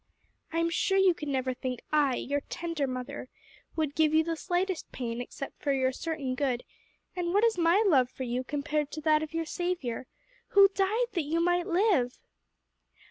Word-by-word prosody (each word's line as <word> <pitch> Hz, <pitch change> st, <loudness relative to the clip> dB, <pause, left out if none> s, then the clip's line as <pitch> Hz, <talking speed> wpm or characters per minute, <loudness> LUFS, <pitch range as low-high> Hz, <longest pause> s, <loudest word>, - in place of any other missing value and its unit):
I 330 Hz, -, -2 dB
am 335 Hz, 0 st, +1 dB
sure 385 Hz, +3 st, +1 dB
you 385 Hz, -2 st, +5 dB
could 300 Hz, -2 st, -7 dB
never 260 Hz, -2 st, 0 dB
think 250 Hz, -1 st, -4 dB
I 285 Hz, -4 st, +3 dB
your 285 Hz, +3 st, -2 dB
tender 335 Hz, -4 st, -2 dB
mother 255 Hz, 0 st, -5 dB, 0.5 s
would 310 Hz, -3 st, -1 dB
give 310 Hz, 0 st, +3 dB
you 320 Hz, -, +5 dB
the 330 Hz, 0 st, -2 dB
slightest 360 Hz, +2 st, -2 dB
pain 235 Hz, -1 st, -4 dB
except 275 Hz, +2 st, -8 dB
for 285 Hz, -, +1 dB
your 260 Hz, -1 st, +2 dB
certain 290 Hz, -2 st, -3 dB
good; 255 Hz, -2 st, -1 dB, 0.5 s
and 355 Hz, 0 st, -1 dB
what 410 Hz, -, +4 dB
is 460 Hz, -1 st, +4 dB
my 345 Hz, +5 st, +4 dB
love 265 Hz, -10 st, +4 dB
for 260 Hz, -, -6 dB
you 250 Hz, +1 st, -2 dB
compared 295 Hz, +1 st, -2 dB
to 310 Hz, -, -5 dB
that 310 Hz, 0 st, +3 dB
of 315 Hz, +1 st, -6 dB
your 330 Hz, 0 st, -1 dB
Saviour? 330 Hz, -9 st, -3 dB, 0.5 s
who 395 Hz, 0 st, +9 dB
died 420 Hz, +5 st, 0 dB
that 350 Hz, -, 0 dB
you 320 Hz, +3 st, 0 dB
might 350 Hz, +1 st, +2 dB
live!" 345 Hz, -, +2 dB
310 Hz, 190 wpm, -29 LUFS, 265-350 Hz, 0.5 s, who